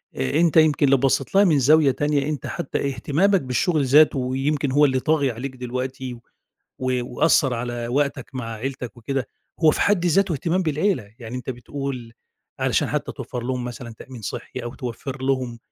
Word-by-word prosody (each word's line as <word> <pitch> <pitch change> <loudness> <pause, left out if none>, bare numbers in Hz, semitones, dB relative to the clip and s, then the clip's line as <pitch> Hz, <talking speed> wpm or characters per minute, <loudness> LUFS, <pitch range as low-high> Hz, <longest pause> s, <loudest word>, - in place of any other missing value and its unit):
آآ 65 - 0
أنت 170 -1 +3
يمكن 155 -2 +5
اللي 135 0 +5
بصّيت 135 +4 0
لها 200 - +7
من 160 -7 +4
زاوية 145 +2 +5
تانية، 145 +1 0
أنت 150 -2 -4
حتّى 140 - -3
اهتمامك 160 +9 +1
بالشغل 140 +4 +1
ذاته، 145 +1 +5
ويمكن 135 +2 -1
هو 145 +2 +5
اللي 130 -2 +2
طاغي 145 -1 +1
عليك 130 +3 -6
دلوقتي، 130 +1 -4
و 120 - -11 0.9
وأثَّر 130 +1 +2
على 120 0 -4
وقتك 140 +3 -1
مع 125 -2 -4
عيلتك 125 +1 -5
وكده، 130 +2 -3 0.3
هو 160 -2 +6
في - - -2
حد 195 -4 +2
ذاته 190 +2 +3
اهتمام 170 +5 0
بالعيلة، 155 - -1
يعني 120 +1 -7
أنت 125 +1 -5
بتقول 125 -1 -6 0.5
علشان - - +1
حتّى - - -2
توفَّر 125 - -6
لهم 125 0 -2
مثلًا 120 -1 -7
تأمين 125 -4 -10
صحي، 115 +5 -5
أو 120 0 -6
توفَّر 130 +2 -6
لهم 130 -3 -1
135 Hz, 175 wpm, -23 LUFS, 125-150 Hz, 0.9 s, لها